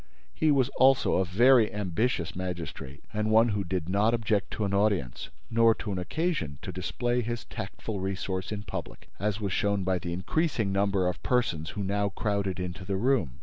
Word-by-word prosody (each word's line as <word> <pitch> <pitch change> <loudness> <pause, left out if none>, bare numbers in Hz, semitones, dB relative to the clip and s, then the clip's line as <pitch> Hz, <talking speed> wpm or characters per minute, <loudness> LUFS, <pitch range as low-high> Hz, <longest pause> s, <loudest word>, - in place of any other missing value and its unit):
He 155 - +2
was 135 -3 +3
also 135 0 +4
a 95 - +2
very 115 +5 +5
ambitious 105 -2 -1
magistrate 85 -5 -6
and 110 0 0
one 115 +2 +5
who 100 -2 -1
did 90 -3 -3
not 105 +5 +2
object 110 -2 0
to 105 - -1
an 100 - -2
audience 100 - 0 0.2
nor 115 0 +5
to 105 - -5
an 95 - -2
occasion 90 - -2
to - - -4
display 120 0 -1
his 120 +1 -4
tactful 100 +1 -5
resource 95 -1 -3
in 105 -1 -4
public, - - -7
as 105 0 -1
was 100 -4 -2
shown 100 -1 +1
by 95 0 +1
the 85 0 -5
increasing 110 - 0
number 100 -1 +1
of 90 - -3
persons 85 -11 0
who 100 - -1
now 100 +1 0
crowded 100 -2 -1
into 90 +1 -5
the 95 +1 -2
room. 100 - +1
100 Hz, 190 wpm, -28 LUFS, 90-115 Hz, 0.2 s, very